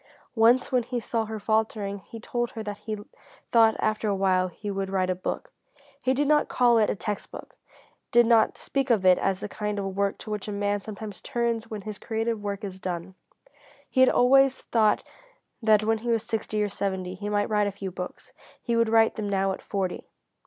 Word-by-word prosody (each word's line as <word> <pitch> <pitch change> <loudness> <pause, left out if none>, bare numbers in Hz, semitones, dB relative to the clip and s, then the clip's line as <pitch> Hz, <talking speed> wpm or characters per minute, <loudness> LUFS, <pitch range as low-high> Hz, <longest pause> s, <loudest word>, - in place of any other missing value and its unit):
Once 235 +2 +4
when 250 -1 +3
he 245 +1 -3
saw 225 0 -1
her 220 0 -5
faltering 210 -1 -1
he 225 +5 -11
told 240 +1 -2
her 220 - -5
that 205 -1 -6
he 215 -1 -4 0.5
thought 225 -2 +5
after 215 0 0
awhile 190 -2 +2
he 205 +4 -6
would 195 -1 -3
write 185 -1 +1
a - - +2
book. 185 - -5 0.5
He 260 0 +1
did 285 +2 +1
not 300 0 +3
call 240 -2 +4
it 215 - +3
a - - 0
text 205 0 -4
book; - - -11 0.6
did 240 0 +6
not 225 -1 +4
speak 275 -1 -2
of 215 -6 +3
it 185 -1 +6
as 195 0 0
the - - -3
kind 210 0 -3
of 195 -1 -3
work 200 0 0
to 215 - -8
which 210 -1 -4
a - - -3
man 205 0 0
sometimes 210 -1 -8
turns 235 -1 -2
when 210 -3 -6
his 210 -1 -6
creative 225 -1 -2
work 205 0 -4
is 190 -2 -6
done. 180 0 -4 0.8
He - - 0
had 260 - +7
always 270 +1 +5
thought 220 -2 +2 0.6
that 215 -2 +4
when 220 +1 +1
he 240 +2 -4
was 230 -2 +1
sixty 215 -1 -2
or 205 - -1
seventy 190 -2 -3
he 205 +2 -5
might 205 0 0
write 210 -1 +2
a - - -1
few 195 -1 -6
books. 180 0 -8 0.3
He 235 - -1
would 230 -1 +3
write 225 0 +4
them 210 -2 -2
now 195 -1 +1
at 190 - -5
forty. 190 -3 -3
215 Hz, 215 wpm, -26 LUFS, 200-230 Hz, 0.8 s, had